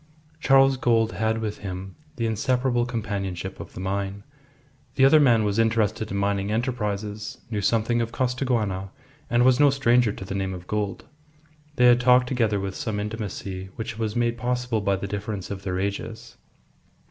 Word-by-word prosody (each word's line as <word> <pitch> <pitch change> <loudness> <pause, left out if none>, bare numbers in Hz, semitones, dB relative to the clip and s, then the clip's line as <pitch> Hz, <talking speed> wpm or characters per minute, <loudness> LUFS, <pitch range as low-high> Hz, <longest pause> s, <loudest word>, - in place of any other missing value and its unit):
Charles 135 -1 +5
Gould 115 -3 +2
had 110 +1 0
with 110 -2 -4
him 95 -1 -6 0.2
the 115 - -2
inseparable 120 +2 +1
companionship 100 -5 -4
of - - -9
the - - -6
mine. 100 +1 -3 0.7
The 135 - +5
other 155 +3 +7
man 120 -6 +4
was 105 +1 0
interested 110 -1 +1
in 100 - -3
mining 100 0 0
enterprises, 105 -3 -3
knew 105 -2 -1
something 115 +3 +1
of 115 0 -3
Costaguana, 120 -8 -1 0.4
and 120 +1 +3
was 130 -1 +5
no 145 -1 +7
stranger 125 -4 +3
to 95 - -8
the 95 - -5
name 95 -1 -2
of 90 -1 -10
Gould. 105 -1 -3 0.7
They 125 - +4
had 120 0 +6
talked 125 0 +5
together 115 -5 0
with 95 0 -3
some 105 0 -3
intimacy 100 -3 -5
which 110 0 -5
was 110 -2 -2
made 120 0 0
possible 125 -2 -1
by 100 -1 +1
the 95 - -5
difference 100 -1 -5
of 100 -1 -5
their 95 -2 -3
ages. 100 +3 -4
110 Hz, 170 wpm, -25 LUFS, 100-120 Hz, 0.7 s, other